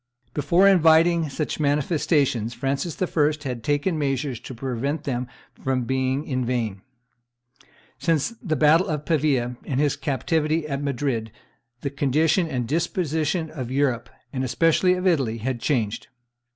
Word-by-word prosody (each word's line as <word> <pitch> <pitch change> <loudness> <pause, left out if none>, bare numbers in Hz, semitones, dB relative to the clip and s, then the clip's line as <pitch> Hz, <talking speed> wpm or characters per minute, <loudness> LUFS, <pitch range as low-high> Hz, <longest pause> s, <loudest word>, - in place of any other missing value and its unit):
Before 170 +7 +4
inviting 165 -2 +5
such 150 +3 -3
manifestations 145 -5 +1
Francis 140 +4 -2
I. 155 -4 +2
had 120 -3 -4
taken 145 +5 0
measures 135 -3 -1
to 125 +1 -9
prevent 135 +5 -3
them 125 -3 -2 0.4
from 130 -1 0
being 130 +3 -1
in 130 -3 -1
vain. 115 -6 -2 1.2
Since 165 +3 +1
the 165 -10 -1
battle 155 +4 +4
of 150 -1 -3
Pavia 135 -7 +1
and 135 -2 -2
his 145 -1 +2
captivity 150 +3 0
at 140 -1 -3
Madrid 130 -5 -2 0.5
the 140 - -3
condition 150 +5 +2
and 125 -6 -2
disposition 160 +1 -1
of 130 -6 -5
Europe, 130 -3 0 0.2
and 130 -1 -2
especially 165 +7 +3
of 180 +1 -4
Italy, 135 -11 +2
had 120 +1 -3
changed. 115 -8 -1
145 Hz, 140 wpm, -24 LUFS, 130-160 Hz, 1.2 s, inviting